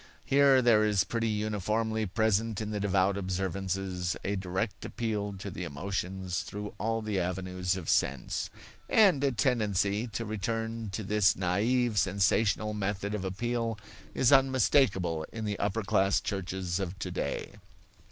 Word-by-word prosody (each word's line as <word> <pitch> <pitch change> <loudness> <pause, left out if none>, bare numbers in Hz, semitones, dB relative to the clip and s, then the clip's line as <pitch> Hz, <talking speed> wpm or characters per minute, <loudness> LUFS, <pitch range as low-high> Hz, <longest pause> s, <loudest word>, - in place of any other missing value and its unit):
Here 135 -2 +5
there 115 -3 +5
is 105 -3 +3
pretty 115 +2 -1
uniformly 110 +1 -1
present 110 +2 +1
in 110 -1 -3
the 105 - -2
devout 100 0 +2
observances 95 -1 -2
a 100 - -1
direct 95 +3 -3
appeal 105 -3 -3
to 100 +1 -7
the 90 - -5
emotions 90 +3 -3
through 105 0 -6
all 115 0 -1
the 105 -3 -1
avenues 90 0 -2
of 85 -4 -7
sense. 65 -1 0 0.4
And 190 -10 +5
a 140 - +3
tendency 110 -3 +1
to 115 +1 -4
return 115 +1 -3
to 110 - -3
this 100 0 +3
naive, 105 +5 +1
sensational 105 +2 +2
method 100 0 -2
of 105 -3 -3
appeal 115 +4 -2 0.4
is 125 - +3
unmistakable 130 - +3
in 110 -1 -5
the 105 -1 -3
upper 105 +2 -1
class 95 +1 +2
churches 95 -2 -3
of 95 -1 -4
today. 95 -1 -3
100 Hz, 140 wpm, -29 LUFS, 95-110 Hz, 0.4 s, Here